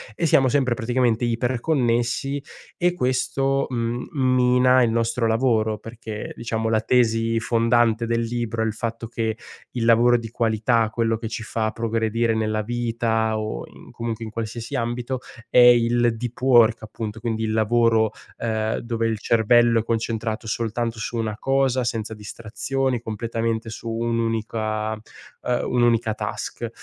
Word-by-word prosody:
e 170 - -1
siamo 135 -4 +4
sempre 130 -2 +2
praticamente 120 -1 +1
iperconnessi 120 +2 0 0.4
e 175 0 +2
questo 135 -1 0
m 120 -1 -2
mina 130 -2 +4
il 120 -2 +3
nostro 115 0 0
lavoro, 110 -2 +1
perché 110 0 -7 0.4
la 110 -1 +3
tesi 115 -1 +2
fondante 115 0 +2
del 115 0 +1
libro 115 -1 -2
è - - 0
il 110 - -1
fatto 115 +1 -4
che 110 -1 -2 0.3
il 120 - -3
lavoro 120 +1 +5
di 115 -1 -7
qualità, 115 0 +1
quello 115 0 0
che 115 0 -5
ci 115 +1 -5
fa 110 -1 -2
progredire 115 0 0
nella 110 -1 0
vita 115 -1 -1
o 110 - -4
in - - -15
comunque 115 -1 -4
in 110 -1 -8
qualsiasi 115 +4 -4
ambito, 120 +1 -2 0.3
è - - +1
il 120 -1 +5
deep 120 +1 -6
work, 120 -4 +5
appunto, 110 0 -6
quindi 110 -1 -2
il 110 - -1
lavoro, 110 0 +3 0.3
ehm, 110 -1 -1
dove 115 -1 -1
il 110 -1 -1
cervello 115 +2 +4
è - - -2
concentrato 115 0 -2
soltanto 115 +1 -2
su 115 +2 -4
una 110 -2 -2
cosa, 135 -1 +1
senza 110 -1 -3
distrazioni, 115 +5 -3
completamente 115 0 -3
su 115 +1 -6
un'unica, 115 -1 -1
ehm, 110 +3 -5
un'unica 120 -2 +2
task. - - -5
115 Hz, 145 wpm, -23 LUFS, 110-120 Hz, 0.4 s, lavoro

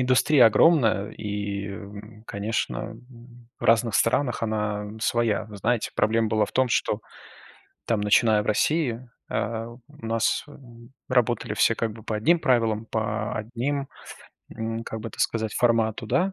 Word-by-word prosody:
индустрия 130 +1 +5
огромная, 110 -6 +4
и, 105 +1 -6
конечно, 105 +2 -2 0.2
м, 120 -1 -17
в - - -8
разных 115 -1 +3
странах 120 +1 +1
она 105 -2 -2
своя. 115 -2 +1
Но, 105 - -10
знаете, 115 +3 0
проблема 110 +1 +2
была 110 -1 +2
в - - -10
том, 130 0 +2
что - - 0 0.9
там, 115 -3 0
начиная 105 +1 +3
в - - -13
России, 125 +1 0 0.2
а, 115 +1 -2
у 120 - -12 0.3
нас, 115 0 0
м, 120 -5 -15 0.2
работали 120 -3 +1
все - - +3
как 115 0 -2
бы 110 0 -13
по 110 - -3
одним 165 +11 +3
правилам, 115 -6 +1
по 110 -1 -2
одним, 125 +6 -3 0.7
м, 115 0 -4
как 110 - -6
бы 115 +1 -6
так - - -9
сказать, 110 -1 0
формату, 115 -1 +1
да. 185 - +1
115 Hz, 150 wpm, -25 LUFS, 105-120 Hz, 0.9 s, индустрия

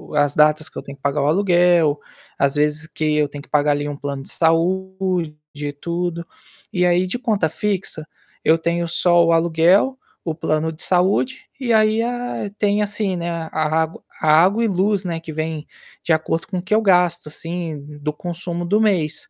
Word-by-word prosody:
as 145 -1 +2
datas 155 +1 +3
que - - -12
eu - - -5
tenho 140 0 -10
que - - -39
pagar 140 +1 0
o 140 - +1
aluguel, 175 -3 +3 0.4
às 140 0 +2
vezes, 150 +1 +1
que 160 - -6
eu 150 -1 +2
tenho 145 0 -9
que - - -20
pagar 150 0 +2
ali 145 0 -1
um 145 - -6
plano 140 -1 -5
de - - -7
saúde, 180 0 0 0.5
tudo. 170 0 -3 0.5
E 180 -1 +1
aí, 180 +1 +2
de 190 - -3
conta 215 -9 0
fixa, 185 -4 -3 0.4
eu 160 - +5
tenho 170 +1 -1
só 175 0 +3
o 165 - +3
aluguel, 170 +9 +3 0.3
o 160 -2 -3
plano 160 0 -1
de 160 - -6
saúde, 190 +8 +1 0.2
e 245 -4 0
aí 220 +1 +3
a 245 -3 -3
tem 205 0 +2
assim, 205 -2 -1
né, 170 0 -3
a 165 -1 -4
a 155 0 0
água 160 +1 -4 0.2
a - - -1 0.2
água 205 +5 +2
e - - +2
luz, 195 0 0
né, 170 -2 -2
que 165 -1 -9
vem 155 0 -4 0.4
de - - -1
acordo 165 +3 -1
com 195 -4 -4
o - - -2
que 190 +4 0
eu 220 - +3
gasto 180 -5 +2
assim 155 -2 -5
do 150 +1 -1
consumo 175 +1 -4
do 205 +5 +2
mês. 200 - 0
170 Hz, 200 wpm, -20 LUFS, 155-190 Hz, 0.5 s, eu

